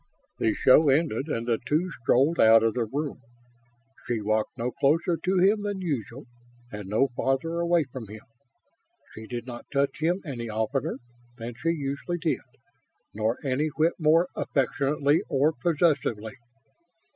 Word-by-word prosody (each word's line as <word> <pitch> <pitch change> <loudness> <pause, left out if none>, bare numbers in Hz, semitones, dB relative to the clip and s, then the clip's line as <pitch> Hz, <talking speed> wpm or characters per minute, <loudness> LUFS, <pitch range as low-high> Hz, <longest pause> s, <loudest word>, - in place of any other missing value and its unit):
The 110 - +1
show 145 +3 +5
ended 135 -2 +1
and 115 -6 -2
the 115 -2 0
two 155 +8 0
strolled 135 +8 +2
out 110 0 +7
of 115 -1 +2
the 120 -2 -1
room. 140 +3 -4 0.9
She 120 -2 -1
walked 110 +3 -1
no 120 +1 -2
closer 165 +7 +1
to 185 +4 -1
him 200 +4 +4
than 205 -1 -3
usual, 135 - -4 0.5
and 105 -2 -7
no 115 +6 +2
farther 135 +7 -1
away 170 -1 +2
from 130 -4 -9
him. 105 +1 -10 0.9
She 110 0 -10
did 120 -1 -5
not 120 -2 -9
touch 140 +1 0
him 170 +4 +1
any 120 -6 -5
oftener 120 +8 -2 0.4
than 120 +1 -6
she 155 +8 -2
usually 150 +2 -2
did, 165 -2 -1 0.7
nor 110 +2 -1
any 135 +3 +1
whit 155 +2 +1
more 165 +3 +4
affectionately 140 +2 +1
or 145 +3 +2
possessively. 140 -7 0
135 Hz, 150 wpm, -26 LUFS, 115-160 Hz, 0.9 s, out